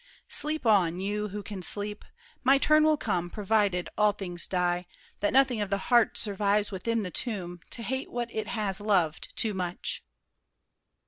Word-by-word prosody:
Sleep 305 -2 0
on, 185 -6 +3
you 210 +2 -2
who 205 +1 -6
can 195 -2 -6
sleep. 205 +4 0 0.4
My 270 +2 +6
turn 305 +2 +4
will 310 -1 +4
come—provided 200 -1 0
all 210 -1 +3
things 175 -4 -4
die, 180 -1 0 0.3
That 205 - +1
nothing 260 -4 +3
of 205 - -2
the 200 - +1
heart 235 +3 +3
survives 205 0 +1
within 225 +3 -1
The 180 - -5
tomb, 180 -5 -3
to 230 - -4
hate 265 +3 -2
what 240 -1 -4
it 215 -1 -3
has 210 -4 -1
loved 185 -7 0
too 220 -2 0
much. 180 -2 -3
205 Hz, 160 wpm, -28 LUFS, 185-230 Hz, 0.4 s, My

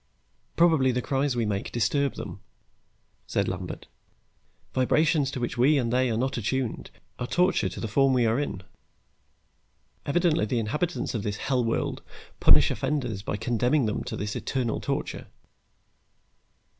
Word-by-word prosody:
"Probably 160 -6 +4
the 125 - -1
cries 135 -1 0
we 120 -2 0
make 100 -2 -2
disturb 135 +5 +1
them," - - -7 0.9
said - - 0
Lambert. - - -5 0.9
"Vibrations 145 +2 +2
to 135 - -5
which 120 0 -3
we 145 +5 +5
and 120 -3 0
they 130 0 +2
are 110 - 0
not 130 0 -1
attuned 125 +2 -2 0.3
are 125 - -3
torture 175 - +2
to 90 - -8
the 115 - -3
form 135 +5 +3
we 125 -2 +3
are 115 +3 +2
in. 100 -10 -3 1.4
Evidently 165 +2 +2
the 125 - -1
inhabitants 150 +11 -1
of 110 - -2
this 105 0 -3
hell 130 -2 0
world 115 0 -1 0.4
punish - - +6
offenders 135 -8 -2
by 105 - -3
condemning 125 +5 +1
them 105 - -2
to - - -4
this 105 0 -3
eternal 125 -4 -2
torture." - - -3
125 Hz, 150 wpm, -26 LUFS, 115-140 Hz, 1.4 s, punish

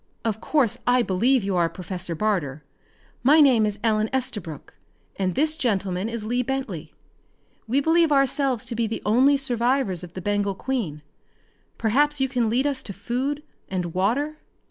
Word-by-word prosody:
Of 220 -1 -1
course 250 -6 +1
I 245 0 +4
believe 235 +6 +2
you 195 -1 -1
are 170 -1 +2
Professor 180 0 -5
Barter. 155 -8 -1 0.6
My 290 +6 +5
name 250 -7 +5
is 210 -1 -3
Ellen 215 -1 +2
Estabrook, 210 - -4 0.4
and 185 -2 -1
this 310 +4 +1
gentleman 200 - -1
is 230 -2 -5
Lee 245 +3 0
Bentley. 230 - -4 0.7
We 265 +5 +2
believe 325 +1 +3
ourselves 275 -3 +2
to 235 - -4
be 230 0 0
the 225 - -5
only 260 +7 +4
survivors 245 - 0
of 175 -1 -10
the - - -6
Bengal 205 0 0
Queen. 190 - -3 0.7
Perhaps 290 +6 +2
you 265 - +2
can 245 -4 0
lead 250 +5 +1
us 280 -2 0
to 200 - -6
food 255 +9 -3 0.3
and 180 -3 -3
water?" 275 +12 0
230 Hz, 165 wpm, -24 LUFS, 195-270 Hz, 0.7 s, My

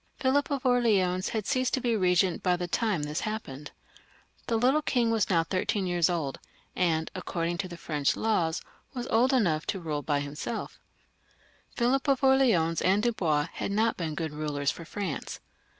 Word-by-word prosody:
Philip 275 +3 +1
of 275 -2 -2
Orleans 205 -8 +2
had 220 -2 -2
left 255 -2 0
oflf - - -2
being 230 -3 +1
regent 180 -1 +2
by 180 -1 +2
the 175 0 -3
time 200 -3 0
this 150 +1 -2
happened. 150 -11 -5 0.8
The 230 - +1
little 260 +6 +3
king 240 -6 +1
was 225 -3 +1
now 165 -4 +3
thirteen 200 +3 -1
years 175 -2 +2
old, 160 -6 -2 0.4
and, 160 -3 0
according 175 -2 -3
to 195 - -2
the 175 -1 -9
French 150 -4 0
laws, 175 -7 0 0.3
was 245 -1 -3
old 240 +4 +4
enough 175 - +1
to 195 - -2
rule 155 -4 -3
by 145 -1 0
himseK. 150 +11 -4 1.1
Philip 260 +3 +1
of 275 -1 +2
Orleans 235 -12 +3
and 195 +3 +2
Dubois 165 -10 +1
had - - -3
not 220 +2 +2
been 160 -3 -4
good 160 -1 -3
rulers 150 -2 -1
for 165 - -9
France. 185 -4 -5
185 Hz, 175 wpm, -28 LUFS, 160-235 Hz, 1.1 s, old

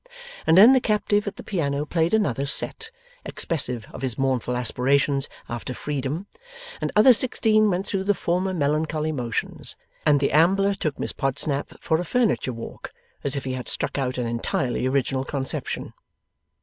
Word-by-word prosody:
And 160 - +5
then 225 +7 +9
the 260 - +5
captive 210 -2 0
at 205 - -4
the - - -10
piano 145 -6 -2
played 165 +4 +1
another 140 - 0
'set,' 445 - +3 0.3
expressive 125 -8 +1
of - - -8
his 130 -4 -2
mournful 130 -2 -1
aspirations 135 +3 +1 0.2
after 120 +2 -5
freedom, 145 +5 -4 0.6
and - - -2
other 220 +5 +7
sixteen 215 -2 +3
went 185 +1 -1
through 195 -1 -3
the 205 0 +2
former 180 +3 -1
melancholy 155 -1 -1
motions, 120 -5 -2 0.3
and 145 -2 +4
the 140 - 0
ambler 195 +6 +3
took 155 -7 -3
Miss - - -3
Podsnap 140 +1 -1
for 160 -1 0
a - - -2
furniture 230 - 0
walk, 115 -1 -8 0.3
as 140 0 +1
if 140 - -3
he 130 - -3
had 125 -1 -6
struck - - -2
out 130 -1 -2
an 125 - -1
entirely 120 +2 -1
original 130 0 0
conception. 135 -1 -4
145 Hz, 165 wpm, -24 LUFS, 130-190 Hz, 0.6 s, then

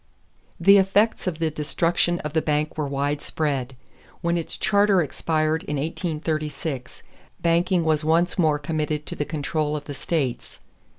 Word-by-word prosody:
The 200 0 +7
effects 200 +3 +2
of 170 -4 -1
the 160 -1 0
destruction 165 +3 0
of 150 -1 -5
the 160 - +2
bank 150 0 0
were 150 -2 -2
widespread. 140 -1 -2 0.5
When 170 0 +1
its 165 -2 -3
charter 205 -2 +3
expired 155 0 0
in 150 - -3
1836, 155 -3 -3 0.4
banking 170 +1 +2
was 155 -1 +1
once 165 +3 +2
more 155 -3 +3
committed 150 0 -2
to - - -5
the 145 - -2
control 150 0 -2
of 150 - -4
the 145 - -6
states. 140 -3 -2
155 Hz, 145 wpm, -24 LUFS, 150-170 Hz, 0.5 s, The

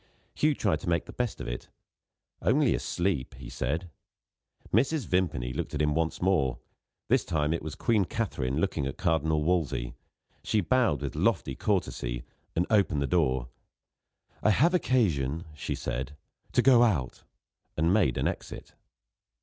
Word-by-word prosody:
Hugh 150 -1 +2
tried 80 - +1
to - - -4
make 85 -1 +1
the - - -10
best 120 -4 -2
of - - -5
it. - - -5 0.7
"Only - - +3
asleep," 85 -9 -1
he 65 -2 -10
said. 80 +6 -3 0.8
Mrs. 135 +5 +2
Vimpany 75 -11 0
looked - - -4
at 75 - 0
him 75 0 +2
once 80 +2 -1
more. 75 -9 +2 0.5
This - - +3
time, 75 -1 0
it 85 - -2
was 80 0 -6
Queen 105 0 +2
Katharine 75 - -2
looking 80 -5 0
at 70 - -5
Cardinal 80 -2 +1
Wolsey. 70 -8 0 0.5
She 110 - +1
bowed 100 - +2
with 70 - -3
lofty 65 - +1
courtesy, 65 - -1 0.3
and 85 - +2
opened 95 -9 +3
the - - +1
door. 65 -7 +1 0.9
"I - - +3
have 155 - +4
occasion," 85 - +1
she 75 - -4
said, 65 +3 -4 0.4
"to - - +4
go 125 -3 +7
out" 85 - +1 0.6
and 80 +3 +3
made 90 - +3
an - - +1
exit. - - -6
80 Hz, 155 wpm, -28 LUFS, 70-100 Hz, 0.9 s, go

